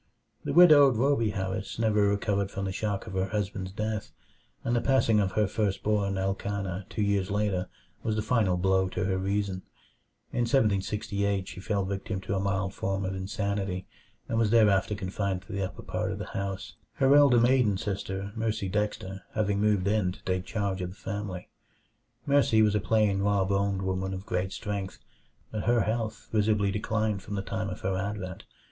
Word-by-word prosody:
The - - -2
widowed 150 -6 +8
Rhoby 115 -3 +2
Harris 95 0 -3
never 105 -2 +3
recovered 100 -1 0
from 100 -1 -4
the 95 - -2
shock 100 0 -2
of - - -8
her 95 0 0
husband's 100 -2 -3
death, 105 +1 -3 0.5
and 120 - 0
the 120 - +2
passing 125 -5 +3
of 95 -2 0
her 105 - +3
first 100 -1 -1
born 100 -2 +1
Elkanah 95 -1 -2
two 105 - -1
years 100 -1 +1
later 100 -3 0 0.3
was 110 - -1
the 110 - -1
final 110 -6 +2
blow 95 +1 +2
to - - -2
her 95 -1 0
reason. 100 -1 -1 0.7
In 120 - +1
1768 100 -4 +1
she - - -8
fell 100 -1 -1
victim 100 +1 -3
to 95 +1 -3
a 95 - +1
mild 95 0 -1
form 95 0 -2
of 95 - -2
insanity, 95 -1 -2 0.4
and 115 - 0
was 110 -2 +3
thereafter 105 -2 +4
confined 95 -1 -2
to - - -12
the 100 0 -2
upper 95 - -5
part - - -2
of - - -4
the - - -5
house; 95 -1 -4 0.2
her 135 +1 +4
elder 140 -5 +6
maiden 120 -4 +3
sister, 100 0 -4
Mercy 110 -3 -1
Dexter, 100 -1 -2
having 100 -2 +1
moved 105 -3 +2
in 100 -3 +1
to - - -17
take 95 0 -1
charge 100 -4 -2
of 90 - -3
the 90 - -11
family. 100 -3 -5 0.8
Mercy 140 -6 +4
was 105 -1 +3
a 105 - +2
plain, 105 -1 +2
raw 100 -1 +2
boned 100 0 0
woman 95 0 -2
of 95 +1 -8
great 90 +1 -1
strength; 100 -3 -4 0.5
but 110 -2 -3
her 120 0 +4
health 110 -1 -2
visibly 105 -2 +2
declined 105 0 -1
from 105 - -6
the 100 - -2
time 105 -1 -3
of 90 - -6
her 95 0 -1
advent. 95 -1 -4
100 Hz, 185 wpm, -28 LUFS, 95-110 Hz, 0.8 s, widowed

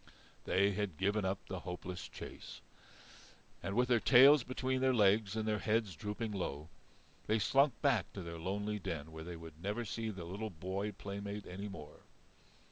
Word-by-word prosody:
They 100 +2 +3
had 100 -5 -2
given 100 +1 +1
up 95 +1 0
the 95 - -5
hopeless 90 0 -6
chase. - - -9 1.0
And 100 - -3
with 125 +1 +3
their 120 -2 +4
tails 135 +4 +8
between 130 +1 -1
their 130 -1 +3
legs 105 -1 +4
and 110 -1 -1
their 105 -1 +1
heads 110 -4 0
drooping 105 +6 -3
low, 80 -6 -4 0.6
they 110 - +3
slunk 135 +5 +3
back 125 -10 +2
to 95 - -6
their 85 0 -6
lonely 105 +4 -2
den 80 -4 -4
where 80 0 -7
they 85 +1 -6
would 80 -1 -11
never 105 +5 -2
see 110 +1 -3
their 95 -5 -6
little 100 +5 -4
boy 95 +4 -3
playmate 100 +1 -6
any 100 +3 -6
more. 75 -7 -9
100 Hz, 175 wpm, -35 LUFS, 90-110 Hz, 1.0 s, tails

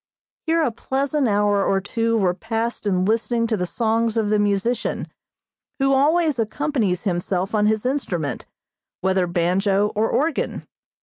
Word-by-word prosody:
Here 330 0 +2
a 250 - +1
pleasant 275 +4 -1
hour 205 -1 +2
or 195 - +2
two 230 +3 -1
were 185 -4 +2
passed 225 +3 -3
in 185 -2 +1
listening 230 +2 +1
to 225 -1 0
the 180 -3 -2
songs 230 +2 0
of 215 -2 +1
the 210 - +3
musician, 205 +4 0 0.7
who 270 -1 +2
always 300 0 +2
accompanies 225 - -1
himself 185 0 -1
on 210 -1 +3
his 220 +1 0
instrument, 175 - -2 0.5
whether 190 -1 +1
banjo 190 +4 +1
or 215 +2 +1
organ. 310 +1 -1
220 Hz, 145 wpm, -22 LUFS, 195-245 Hz, 0.7 s, the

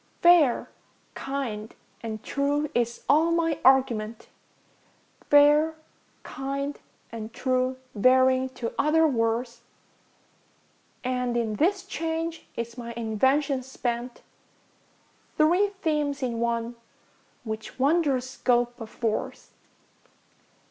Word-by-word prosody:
ŌĆśFair, 340 -7 +5 0.5
kind, 240 -6 -5 0.3
and 220 -2 -6
true, 285 +2 0
ŌĆÖ - - -25
is 235 -1 -1
all 315 +4 +4
my 330 -2 +1
argument, 235 -4 +2 1.0
ŌĆśFair, 295 +2 +5 0.5
kind, 275 +1 -4 0.3
and 225 -1 -7
true, 255 0 0 0.2
ŌĆÖ 205 - -6
varying 260 +1 +4
to 245 -3 -5
other 320 +2 +4
words; 235 -2 -1 1.4
And 250 -1 -1
in 220 -3 -1
this 375 +5 +1
change 330 -2 -4
is 235 +1 -5
my 235 0 -6
invention 265 +5 +1
spent, 245 -1 -4 1.1
Three 345 +6 +4 0.2
themes 295 -3 0
in 235 -2 -2
one, 235 0 -2 0.7
which 220 -1 -6
wondrous 275 -2 +2
scope 245 -2 0
affords. 225 0 -4
260 Hz, 100 wpm, -26 LUFS, 235-295 Hz, 1.4 s, ŌĆśFair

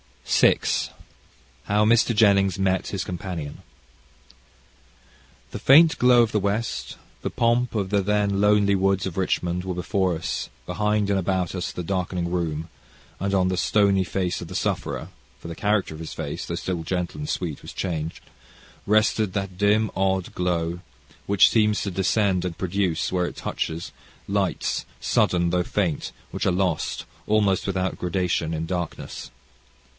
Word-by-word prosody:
CHAPTER - - +4
VI - - 0 0.7
How 105 +1 +2
Mr. 115 +1 +4
Jennings 100 -3 +4
Met 95 -1 +1
His 100 - -3
Companion 90 -5 -5 1.9
The - - -5
faint 160 +4 +6
glow 125 -1 +6
of 115 - -1
the 105 - +1
west, 100 +3 -2 0.2
the - - -2
pomp 120 0 +1
of 100 -2 -1
the 100 -1 +3
then 100 0 +1
lonely 105 -1 +4
woods 95 0 +2
of 95 -2 -5
Richmond, 90 -1 0
were 90 -1 -3
before 95 0 0
us, 80 0 -3 0.2
behind 105 -1 0
and 100 - +2
about 95 -1 -1
us 90 -1 -3
the 90 - -5
darkening 90 -1 -2
room, 80 -2 -2 0.5
and 100 +1 0
on 90 -1 +3
the 95 - -1
stony 100 -1 +3
face 90 +1 -2
of - - -6
the - - -8
sufferer - - -2 0.3
for - - -10
the 85 - -5
character 105 -1 0
of 80 - -9
his 80 - -6
face, - - -5
though - - -3
still 90 -3 -3
gentle 90 +1 -3
and 150 0 -5
sweet, 85 -6 -3
was - - -9
changed 80 -3 -4 0.6
rested 110 -1 +2
that 95 -2 -3
dim, 105 +2 +3
odd 95 -1 0
glow 85 -1 -1 0.5
which 100 -1 +6
seems 105 -2 +2
to 100 - -2
descend 95 0 +1
and 85 -2 -4
produce, 95 -2 -1
where 90 -1 +1
it - - -7
touches, 80 +1 -4 0.4
lights, 100 -3 -1
sudden 85 -1 +2
though 90 0 +2
faint, 90 -3 -1 0.2
which - - -2
are - - +4
lost, 90 -3 -1 0.2
almost 105 -3 +2
without 95 -1 -1
gradation, 90 -2 0
in 80 0 -2
darkness. 85 -1 -5
95 Hz, 160 wpm, -24 LUFS, 90-105 Hz, 1.9 s, faint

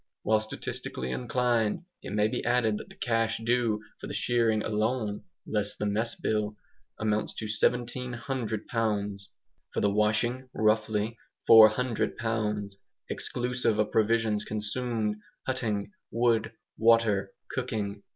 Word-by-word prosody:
While 110 0 +3
statistically 65 -11 -4
inclined, 120 - 0 0.2
it - - -7
may 105 0 +3
be - - -3
added 115 -3 +2
that - - -10
the - - -14
cash 115 -2 0
due 115 -2 +1 0.2
for - - -7
the - - -5
shearing 115 -3 +2
alone 110 -1 -1 0.2
(less 105 -1 0
the 105 - -3
mess 110 +3 0
bill) 105 -1 -1 0.4
amounts 105 0 0
to 110 - -4
1700 120 0 -1
pounds; 105 -4 -1 0.4
for - - -1
the 100 - +2
washing 115 +5 +1
(roughly), 110 +1 +1 0.3
400 115 +2 +6
pounds, 105 -3 -2 0.3
exclusive 125 -3 -1
of 105 0 +1
provisions 110 -1 +2
consumed, 110 0 -2 0.3
hutting, 115 - -1 0.2
wood, 115 -2 +2 0.3
water, 110 -4 +4 0.2
cooking. 105 -6 -3
110 Hz, 120 wpm, -29 LUFS, 105-120 Hz, 0.4 s, 400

